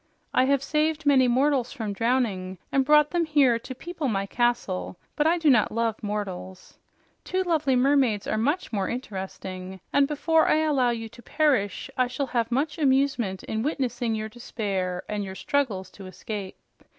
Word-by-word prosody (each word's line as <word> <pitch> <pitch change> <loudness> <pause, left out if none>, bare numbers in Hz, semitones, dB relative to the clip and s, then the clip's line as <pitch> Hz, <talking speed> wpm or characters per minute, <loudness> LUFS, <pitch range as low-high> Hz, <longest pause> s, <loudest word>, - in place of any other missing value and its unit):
I 255 - +4
have 275 0 +2
saved 310 +1 0
many 265 -3 +5
mortals 260 0 +2
from 220 -7 -4
drowning 200 -5 0
and 270 - +3
brought 300 +1 +5
them 345 -1 +1
here 285 -7 +3
to 260 +3 -8
people 330 +1 -4
my 195 -4 0
castle, 200 - -1 0.2
but 300 +1 +2
I 340 +2 +3
do 325 -2 0
not 245 -7 +4
love 230 -1 -1
mortals. 190 -3 -6 0.4
Two 375 0 -1
lovely 310 -7 +1
mermaids 255 -5 +2
are - - -1
much 290 +5 -1
more 195 -3 -1
interesting, 190 -5 -6
and 280 -1 +4
before 320 +2 +2
I 310 - +3
allow 280 -6 +2
you 225 -1 -3
to 240 +2 -15
perish, 260 -9 0
I 255 - +4
shall 255 +3 -2
have 235 -1 0
much 290 +6 -1
amusement 265 -8 +1
in 220 0 -3
witnessing 245 -4 -1
your 215 0 -3
despair 195 -6 -3
and 210 -1 -2
your 190 -1 -7
struggles 205 -9 -1
to 195 -2 -11
escape. 190 +1 -6
245 Hz, 175 wpm, -26 LUFS, 205-285 Hz, 0.4 s, many